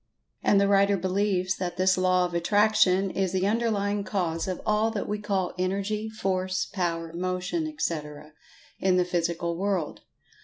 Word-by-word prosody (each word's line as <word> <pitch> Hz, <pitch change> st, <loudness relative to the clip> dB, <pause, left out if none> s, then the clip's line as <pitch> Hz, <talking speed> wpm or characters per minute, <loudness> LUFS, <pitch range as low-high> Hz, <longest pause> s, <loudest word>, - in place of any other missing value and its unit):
And 200 Hz, -, +4 dB
the 200 Hz, -, +3 dB
writer 200 Hz, 0 st, +4 dB
believes 185 Hz, 0 st, 0 dB
that 175 Hz, -1 st, -4 dB
this 185 Hz, 0 st, +3 dB
"Law 185 Hz, 0 st, +2 dB
of 175 Hz, -, -5 dB
Attraction" 200 Hz, +1 st, +3 dB
is 190 Hz, -1 st, -1 dB
the 190 Hz, 0 st, +1 dB
underlying 205 Hz, -2 st, 0 dB
cause 175 Hz, -4 st, -2 dB
of 185 Hz, -1 st, -3 dB
all 215 Hz, +1 st, +2 dB
that 220 Hz, -3 st, -3 dB
we 210 Hz, 0 st, -2 dB
call 195 Hz, -3 st, -1 dB
Energy, 200 Hz, +4 st, -1 dB
Force, 190 Hz, -3 st, -1 dB
Power, 165 Hz, -4 st, -3 dB
Motion, 185 Hz, -, -2 dB
etc., 150 Hz, -, -4 dB, 0.5 s
in 185 Hz, -1 st, +2 dB
the 180 Hz, -, +3 dB
Physical 170 Hz, -1 st, -1 dB
world. 190 Hz, -3 st, -2 dB
185 Hz, 155 wpm, -26 LUFS, 180-205 Hz, 0.5 s, And